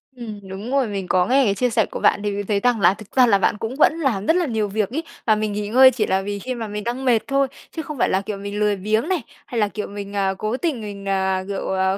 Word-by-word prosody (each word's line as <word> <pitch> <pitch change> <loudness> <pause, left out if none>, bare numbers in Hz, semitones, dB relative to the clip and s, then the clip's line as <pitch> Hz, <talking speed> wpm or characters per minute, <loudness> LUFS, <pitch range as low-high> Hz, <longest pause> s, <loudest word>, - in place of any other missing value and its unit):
Ừm, 220 -4 -7
đúng 200 +6 -6
rồi, 275 -3 +2
mình 195 -3 -4
có 180 0 +3
nghe 265 +1 +4
cái 200 - +1
chia 250 +4 +1
sẻ 230 - +2
của - - -4
bạn 205 - +3
thì 205 - 0
mình 200 0 -3
thấy 205 -1 +1
rằng 245 0 +2
là 180 +2 +6
thực 205 0 -13
ra 255 -1 +5
là 200 -4 +5
bạn 195 - +1
cũng 225 +4 -4
vẫn 300 - +4
làm 230 -10 0
rất 320 - +3
là 360 -2 +2
nhiều 220 -5 -1
việc 210 0 -1
ấy. 315 +6 -3 0.2
Và 220 - +4
mình 215 0 -1
nghỉ 205 0 -3
ngơi 260 +3 +7
chỉ 230 -4 0
là 190 -1 +1
vì 205 +1 -4
khi 255 +5 -4
mà 225 -2 -4
mình 210 0 -5
đang 245 +4 -3
mệt 235 -4 +2
thôi, 275 0 +2 0.2
chứ 320 - -4
không 300 0 -7
phải - - +2
là, 190 - +1
kiểu, 200 0 -5
mình 200 +1 -5
lười 210 -1 +2
biếng 215 - 0
này. 365 -5 +1 0.2
Hay 235 - -3
là, 210 - +3
kiểu, 210 +1 -5
mình, 200 0 -7
à, 195 -1 +1
cố 215 +5 -2
tình 285 -7 -2
mình, 200 -1 -7
à, 190 -1 0
kiểu, 200 -1 -4
ờ, 190 0 +1
210 Hz, 305 wpm, -22 LUFS, 200-250 Hz, 0.2 s, ngơi